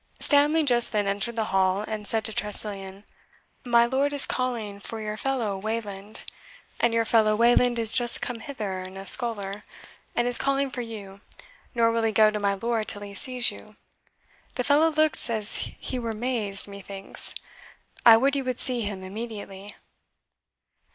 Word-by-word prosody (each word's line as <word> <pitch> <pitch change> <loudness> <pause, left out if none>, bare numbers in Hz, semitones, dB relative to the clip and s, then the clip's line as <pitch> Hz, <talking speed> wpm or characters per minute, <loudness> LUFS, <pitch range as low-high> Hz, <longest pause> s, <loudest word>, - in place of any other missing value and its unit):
Stanley 295 +2 +3
just 240 -4 +3
then 210 -2 0
entered 200 +4 -2
the 225 - -1
hall, 190 +2 +1
and 215 -2 -5
said 220 0 0
to 220 - -2
Tressilian, 200 -1 -1 0.6
"My 235 -1 +4
lord 270 +4 0
is 285 - +8
calling 230 -6 -3
for 225 +2 -7
your 210 -1 -5
fellow 235 -4 -2
Wayland, 210 -1 -5 0.6
and 235 - +2
your 230 0 +1
fellow 215 -2 +3
Wayland 240 +2 +3
is 225 -1 +3
just 240 -2 +5
come 245 -2 -5
hither 215 -9 -5
in 185 +1 -10
a 195 - -8
sculler, 205 -3 +1 0.5
and 240 - +1
is 245 - +5
calling 275 0 0
for 250 - -4
you, 200 -4 -9 0.5
nor 230 -1 +3
will 230 0 -1
he 225 -1 +1
go 215 0 +4
to 210 - -4
my 200 -1 0
lord 225 +1 -2
till 205 -1 0
he 200 -1 -9
sees 250 +2 +1
you. - - -14 0.8
The 250 - -2
fellow 295 +4 +3
looks 310 -4 +1
as 215 -2 0
he 255 - -4
were 230 -2 -4
mazed, 215 -4 -1
methinks; 200 -1 -2 0.7
I 225 -1 +8
would 275 +4 +1
you 275 - -1
would 255 -1 -4
see 250 -2 +2
him 200 -3 -5
immediately." 205 -1 -8
225 Hz, 170 wpm, -25 LUFS, 205-245 Hz, 0.8 s, is